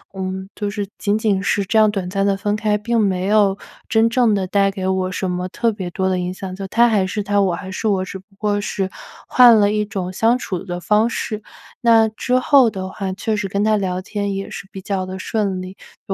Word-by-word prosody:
嗯， 190 0 -4
就 205 -1 -3
是 205 -1 -4
仅 205 +1 +1
仅 205 -3 +1
是 200 0 0
这 220 +3 +2
样 215 - +5
短 195 -3 -3
暂 195 -1 0
的 200 -1 +1
分 205 +1 -1
开， 215 -1 +1
并 230 +2 0
没 190 -3 0
有 200 -1 +3 0.3
真 225 0 +4
正 230 -2 +3
的 195 - -1
带 195 +1 +2
给 190 -1 -4
我 190 0 0
什 185 0 -2
么 180 +1 -2
特 230 +4 0
别 190 -4 -5
多 190 +2 -1
的 185 -1 0
影 180 0 -2
响， 185 0 -7
他 235 +3 +4
还 205 -4 +2
是 205 +2 -3
他， 205 0 +1
我 185 -3 +1
还 190 - -7
是 215 +4 -3
我， 190 -2 +1
只 190 - -7
不 190 - -21
过 205 -1 0
是 195 -2 -2 0.4
换 245 -3 +7
了 205 0 +3
一 210 0 +1
种 190 -3 -4
相 230 +5 +3
处 185 -7 -4
的 175 -1 -5
方 210 +5 +2
式， 215 -2 -4 0.4
那 230 -2 +5
之 245 +4 -1
后 260 -2 +5
的 190 -3 -5
话 190 0 -4
确 215 +3 -2
实 210 -1 -2
跟 200 +1 0
他 215 0 +3
聊 185 -2 -2
天 200 0 -3
也 195 - -4
是 - - -8
比 190 - -8
较 190 -1 -3
的 185 0 -6
顺 200 -1 -2
利， 185 +1 -9 0.3
就 195 - -1
200 Hz, 260 characters per minute, -20 LUFS, 190-215 Hz, 0.4 s, 换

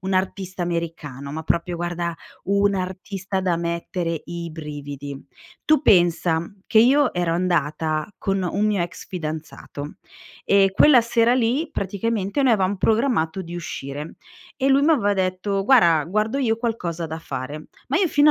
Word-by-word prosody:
un'artista 190 0 -2
americano, 160 -5 -4
ma 160 +1 -4
proprio 170 +2 -1
guarda, 175 0 -3 0.3
un'artista 195 0 -1
da 180 -3 +1
mettere 170 -1 -3
i 170 -1 -5
brividi. 145 -3 -7 0.5
Tu 310 0 +4
pensa 175 - +3 0.2
che 220 - +4
io 265 +4 +4
ero 175 -2 0
andata 160 0 0
con 195 -1 -1
un 200 +4 0
mio 205 -4 +1
ex 175 - -7
fidanzato, 155 -4 -6 0.5
ehm, 195 -1 +5
quella 260 +5 +6
sera 230 0 +2
lì 255 +6 +1
praticamente 200 +5 -1
noi 255 -3 +4
avevam 195 -1 +1
programmato 215 -6 +1
di 170 -1 -7
uscire 150 -3 -6 0.4
e 270 - +2
lui 275 +1 +4
m'aveva 260 -10 +3
detto: 190 +1 -1
"Guarda 170 - +5
guardo 215 - 0
io 235 -5 +1
qualcosa 175 -8 -3
da 160 +1 -5
fare". 150 0 -6 0.2
Ma 280 - +1
io 365 -2 +3
fino 290 +1 +5
185 Hz, 145 wpm, -23 LUFS, 165-215 Hz, 0.5 s, quella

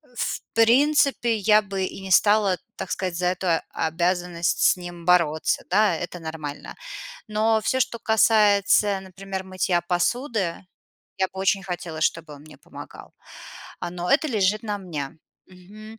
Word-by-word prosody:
в - - -2
принципе 245 +1 +3
я 210 +1 +4
бы 195 -2 -4
и - - -7
не 190 0 -7
стала, 205 -2 +4 0.2
так - - -6
сказать, 185 -2 -2
за 180 - -1
эту 180 +1 -2 0.2
обязанность 175 +1 -1
с - - +4
ним 175 -1 -9
бороться. 170 -4 +2
Да, 205 -1 +3
это 175 +2 -6
нормально. 160 -3 -7 0.5
Но 220 +1 +2
всё, 260 - 0
что 235 - 0
касается,у 210 -2 +3
например, 190 0 -7
мытья 185 -2 0
посуды, 190 +1 -1 0.5
я 190 - +2
бы 190 - -8
очень 195 0 +1
хотела, 175 -4 -6
чтобы 160 -2 -1
он 140 - -14
мне 155 0 -15
помогал. - - -12 0.7
А, 175 - -4
но 180 0 -4
это 310 - +3
лежит 210 -3 +1
на 210 -2 -3
мне. 160 -5 -6 0.3
Мгм. 210 +5 -14
190 Hz, 150 wpm, -24 LUFS, 175-215 Hz, 0.7 s, я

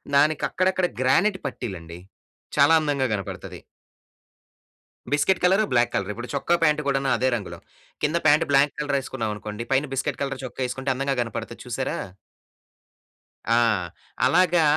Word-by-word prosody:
దానికక్కడక్కడ 175 +5 +2 0.2
granite 185 +10 +3
పట్టీలండి. 90 -10 -6 0.6
చాలా 145 +3 +6
అందంగా 140 -4 0
గనపడతది. 100 -3 -6 1.5
Biscuit 150 +6 +2
colour, 190 +4 +4
black 120 0 +3
colour. 100 0 -1
ఇప్పుడు 120 +2 -7
చొక్కా, 155 +5 +1
ప్యాంటు 150 -1 +3
కూడాను 135 -1 +1
అదే 130 +2 +1
రంగులో. 100 - -7 0.5
కింద 155 +3 +1
ప్యాంట్ 150 +1 +5
బ్లాంక్ 140 +1 +4
కలరేసుకున్నావనుకోండి, 115 -6 -3
పైన 140 +3 +2
బిస్కెట్ 135 - -2
కలర్ 135 -1 -3
చొక్కా 130 +1 -5
యేసుకుంటే, 130 +2 -2
అందంగా 135 +1 -1
కనపడతది 115 -3 -6
చూశారా? - - -2 1.5
ఆ! - - +5 0.7
అలాగా 175 -1 +4
135 Hz, 120 wpm, -24 LUFS, 120-150 Hz, 1.5 s, చాలా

